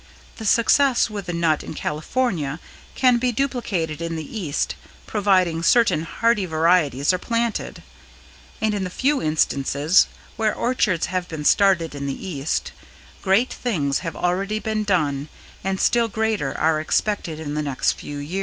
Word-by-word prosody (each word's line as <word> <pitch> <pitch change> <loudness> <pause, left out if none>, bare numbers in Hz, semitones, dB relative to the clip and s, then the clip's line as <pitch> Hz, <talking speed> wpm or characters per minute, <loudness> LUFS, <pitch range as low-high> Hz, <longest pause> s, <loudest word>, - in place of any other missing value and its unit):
The 220 - -7
success 245 +1 +3
with 200 -3 -6
the 175 - -3
nut 165 -2 +1
in - - -7
California 155 - -2 0.4
can 250 -2 +4
be 250 0 +1
duplicated 215 - -2
in 165 0 -3
the 160 -1 -5
East 150 -7 -1 0.3
providing 185 -5 +2
certain 225 -2 +4
hardy 215 +1 +1
varieties 160 -3 +2
are 185 - -1
planted; 230 +1 -2 0.8
and 220 -1 +1
in 200 -2 -2
the 185 - -3
few 275 +9 0
instances 155 +1 +2 0.3
where 220 -2 +1
orchards 210 -8 +1
have 180 -1 -3
been 155 -2 -6
started 185 -5 +3
in 140 -1 -5
the 140 +7 -5
East, 150 -4 -2 0.5
great 200 +6 +2
things 150 - -1
have 165 -2 -5
already 195 +4 -1
been 215 0 -2
done 150 -8 0 0.3
and 190 0 -1
still 235 -1 +3
greater 220 -9 -1
are 155 0 +2
expected 165 -1 -1
in 150 -2 -5
the 150 - -1
next 140 -4 0
few 145 - -7
years. 150 +7 -4
180 Hz, 155 wpm, -22 LUFS, 155-220 Hz, 0.8 s, can